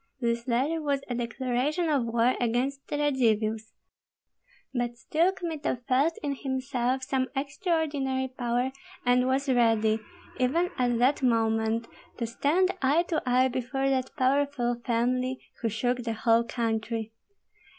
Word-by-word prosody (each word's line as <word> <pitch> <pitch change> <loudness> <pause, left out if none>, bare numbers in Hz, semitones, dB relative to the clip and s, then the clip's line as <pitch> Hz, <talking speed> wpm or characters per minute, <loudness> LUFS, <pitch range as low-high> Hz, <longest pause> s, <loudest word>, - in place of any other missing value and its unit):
This 235 -1 -1
letter 275 +7 +1
was 285 -2 0
a 245 - -3
declaration 255 +7 -1
of 285 -6 +2
war 235 +2 +3
against 250 +4 -1
the 295 - -2
Radzivills; 225 -6 +1 1.0
but 240 -1 -2
still 330 +9 +2
Kmita 320 -9 -3
felt 280 +6 +2
in 285 -1 0
himself 260 -1 -1
some 260 -1 0
extraordinary 280 -2 -1
power, 245 0 -1 0.3
and 250 +1 +3
was 270 +2 +1
ready, 225 -3 +3 0.4
even 330 +8 +2
at 245 -1 +2
that 255 +5 +3
moment, 225 -2 +1 0.3
to 235 - -1
stand 305 +11 +2
eye 285 +5 +3
to 320 - +1
eye 250 +1 +4
before 260 +2 -1
that 260 -1 0
powerful 260 -2 +1
family 255 +1 0 0.2
who 230 - +1
shook 245 +3 0
the 230 -2 -2
whole 230 +1 +3
country. 225 -1 -2
255 Hz, 135 wpm, -28 LUFS, 235-275 Hz, 1.0 s, eye